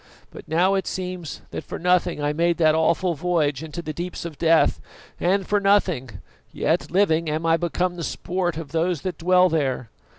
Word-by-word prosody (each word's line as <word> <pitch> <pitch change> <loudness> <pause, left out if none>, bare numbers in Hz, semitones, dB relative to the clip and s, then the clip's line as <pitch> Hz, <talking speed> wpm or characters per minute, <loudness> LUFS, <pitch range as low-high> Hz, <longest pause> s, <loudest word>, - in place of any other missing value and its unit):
But - - -12
now 175 +5 +2
it 195 -1 -1
seems 180 -4 -5
that - - -5
for - - -6
nothing 180 -3 +1
I 145 0 +1
made 170 +2 +1
that 155 -2 +4
awful 170 +3 +2
voyage 155 -4 0
into 160 +2 -6
the 155 - -5
deeps 175 +2 -5
of 155 -4 -7
death; 165 -1 +3 0.4
and 190 +2 +1
for 205 +2 +1
nothing, 195 -10 +2 0.4
yet - - 0
living, 170 -4 +2
am 155 +2 -2
I 165 0 +4
become 175 +1 -1
the 170 - -4
sport 175 0 -2
of 160 -3 -7
those 165 -1 0
that 185 -4 -4
dwell 180 +2 +4
there. 135 -8 -1
170 Hz, 190 wpm, -23 LUFS, 160-180 Hz, 0.4 s, that